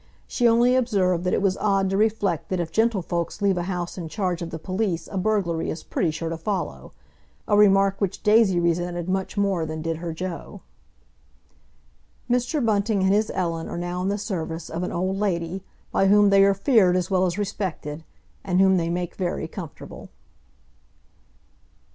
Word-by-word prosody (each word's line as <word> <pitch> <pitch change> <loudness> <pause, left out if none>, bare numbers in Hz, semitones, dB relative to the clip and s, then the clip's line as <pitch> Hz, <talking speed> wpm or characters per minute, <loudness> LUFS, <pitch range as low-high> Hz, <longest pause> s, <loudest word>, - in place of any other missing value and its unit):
She 240 - +1
only 240 +2 +4
observed 190 -8 +1
that 180 - +1
it - - -1
was 190 -1 +2
odd 195 -2 +1
to - - 0
reflect 205 -5 0
that 185 - -1
if 165 -2 -3
gentlefolks 190 -7 0
leave 200 -2 +2
a 175 - -1
house 180 0 -4
in 165 -2 -6
charge 180 -2 -2
of 170 - -4
the 160 - -5
police 185 +1 -2
a - - -6
burglary 185 -4 0
is 160 - -5
pretty 175 - -1
sure 165 +1 -4
to 165 - -4
follow—a 165 - -5
remark 195 -1 +4
which 195 -1 -2
Daisy 210 -4 +4
resented 175 0 -1
much 190 +2 -2
more 195 -4 +1
than 155 0 -5
did 165 -1 -2
her 170 0 -5
Joe. 175 +1 -6 1.7
Mr. 250 +3 0
Bunting 205 -2 +1
and 190 +1 +3
his 215 +1 +2
Ellen 165 -3 -2
are - - -5
now 175 +1 -3
in 185 - -1
the 200 +1 0
service 170 -6 -4
of 165 +2 -3
an 180 - -3
old 185 +2 -1
lady, 185 -2 -2 0.3
by 195 - +2
whom 205 0 +5
they 195 0 +6
are 200 0 +3
feared 195 -4 +4
as 185 +1 -2
well 185 0 +3
as 175 +1 -3
respected, 180 -7 -4 0.4
and 185 -1 0
whom 190 0 +5
they 165 -1 0
make 175 0 -2
very 175 -4 -3
comfortable. 165 -3 -9
185 Hz, 180 wpm, -24 LUFS, 170-200 Hz, 1.7 s, they